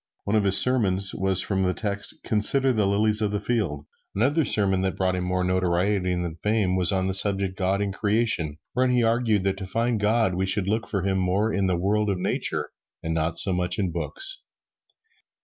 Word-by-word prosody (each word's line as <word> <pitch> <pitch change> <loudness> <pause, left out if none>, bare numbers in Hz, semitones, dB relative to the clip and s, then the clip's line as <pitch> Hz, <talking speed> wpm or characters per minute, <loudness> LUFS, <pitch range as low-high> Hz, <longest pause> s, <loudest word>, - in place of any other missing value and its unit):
One 100 - -1
of 105 -2 +2
his 100 0 +8
sermons 100 -7 +3
was 95 -1 +1
from 95 -2 -2
the 90 -1 0
text, 100 -2 -5
"Consider 130 +5 +2
the 105 -3 +1
lilies 105 +2 +2
of 105 - 0
the 105 0 -2
field." 100 -10 -2 0.3
Another 140 +10 +1
sermon 95 -6 0
that 95 0 -2
brought 95 -1 0
him 90 - -3
more 90 0 -1
notoriety 90 +1 0
than 85 -2 -4
fame 105 -2 0
was 90 -3 +3
on 95 -1 0
the 95 - -2
subject, 95 -1 +1
"God 95 +1 -1
in 100 - -3
Creation," 100 -7 -1 0.2
wherein 125 0 +1
he 120 -1 +2
argued 115 -3 +1
that 95 0 -1
to 95 - -6
find 115 +3 -1
God 105 -1 +1
we 95 +2 -2
should 100 0 -1
look 110 +3 -1
for 100 -4 -3
Him 95 -1 0
more 95 +4 0
in 100 -1 0
the 90 -2 0
world 105 +4 0
of 95 - -1
Nature 90 - -2 0.3
and 80 - -2
not 80 +1 -2
so 95 - +2
much 90 0 +1
in 95 -4 -1
books. 390 - 0
100 Hz, 210 wpm, -24 LUFS, 90-110 Hz, 0.3 s, his